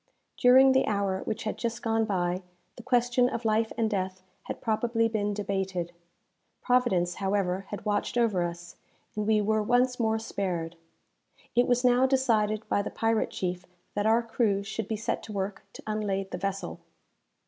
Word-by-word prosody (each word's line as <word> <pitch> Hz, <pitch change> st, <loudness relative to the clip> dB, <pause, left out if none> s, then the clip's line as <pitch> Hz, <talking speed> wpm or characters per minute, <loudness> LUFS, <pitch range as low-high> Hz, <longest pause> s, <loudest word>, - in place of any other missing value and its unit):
During 260 Hz, +2 st, +6 dB
the 265 Hz, 0 st, +3 dB
hour 200 Hz, -2 st, 0 dB
which 215 Hz, -, -3 dB
had 215 Hz, -, -3 dB
just 235 Hz, 0 st, -3 dB
gone 225 Hz, -1 st, +1 dB
by, 180 Hz, -3 st, -1 dB, 0.3 s
the -, -, -10 dB
question 245 Hz, +1 st, +2 dB
of 230 Hz, -1 st, -4 dB
life 220 Hz, +1 st, +2 dB
and 225 Hz, -1 st, +2 dB
death 185 Hz, -3 st, -3 dB, 0.2 s
had -, -, -5 dB
probably 230 Hz, +1 st, +1 dB
been 210 Hz, -2 st, -1 dB
debated. 190 Hz, -4 st, -2 dB, 0.7 s
Providence, 225 Hz, -9 st, +2 dB
however, 195 Hz, -1 st, 0 dB
had 205 Hz, -, -6 dB
watched 210 Hz, +3 st, -1 dB
over 220 Hz, -6 st, +2 dB
us, 175 Hz, 0 st, -5 dB, 0.4 s
and 210 Hz, 0 st, -2 dB
we 215 Hz, -1 st, +4 dB
were 215 Hz, +1 st, +1 dB
once 250 Hz, +3 st, +2 dB
more 220 Hz, -1 st, +2 dB
spared. 180 Hz, -6 st, -3 dB, 0.8 s
It 245 Hz, +1 st, +3 dB
was 245 Hz, 0 st, +2 dB
now 250 Hz, +1 st, +5 dB
decided 220 Hz, -5 st, +1 dB
by 200 Hz, -, +1 dB
the -, -, -4 dB
pirate 225 Hz, -1 st, 0 dB
chief 180 Hz, -1 st, -4 dB, 0.3 s
that 205 Hz, +1 st, 0 dB
our 230 Hz, +2 st, +4 dB
crew 225 Hz, -3 st, 0 dB
should 215 Hz, +1 st, -4 dB
be 220 Hz, -, -2 dB
set 220 Hz, -, -2 dB
to 215 Hz, -, -9 dB
work 200 Hz, 0 st, -4 dB
to -, -, -11 dB
unlade 200 Hz, -3 st, -2 dB
the 180 Hz, -, -4 dB
vessel. 195 Hz, 0 st, -3 dB
215 Hz, 170 wpm, -28 LUFS, 195-230 Hz, 0.8 s, During